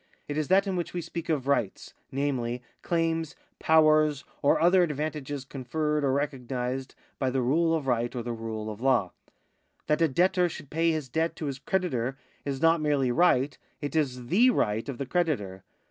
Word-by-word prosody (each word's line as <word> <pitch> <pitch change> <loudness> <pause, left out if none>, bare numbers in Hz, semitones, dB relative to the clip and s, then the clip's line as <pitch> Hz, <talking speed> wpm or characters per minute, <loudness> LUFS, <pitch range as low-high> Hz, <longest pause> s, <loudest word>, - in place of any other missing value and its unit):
It 145 - -4
is 155 -1 -1
that 195 +2 +4
in 195 -2 -2
which 175 0 -3
we 175 - -1
speak 170 0 -6
of 140 -5 0
rights, 135 -8 -1 0.2
namely, 125 -3 -2 0.2
claims, 165 -2 -1 0.2
powers, 155 -2 +4 0.2
or 140 - +3
other 180 +3 +5
advantages 150 -3 -2
conferred 150 +3 -2
or 135 - +2
recognised 130 -2 -3 0.2
by 130 - +1
the 130 0 0
rule 165 +6 +2
of 155 -4 -3
right 120 -1 0
or 120 - -3
the 120 0 -3
rule 110 -1 -5
of 105 +2 -9
law. 125 -8 +2 0.7
That 150 +2 +1
a 165 - +5
debtor 180 +4 +2
should 145 -3 -10
pay 165 +2 +2
his 155 -4 -1
debt 160 +6 -1
to 155 - -5
his 135 -2 -4
creditor 135 -8 -1 0.3
is 140 0 -3
not 165 0 +4
merely 145 -4 +1
right, 140 -2 +3 0.2
it 145 +2 -4
is 130 -5 0
the 220 - +4
right 110 - 0
of 135 - -4
the 140 - -3
creditor. 125 - -1
145 Hz, 185 wpm, -28 LUFS, 125-165 Hz, 0.7 s, other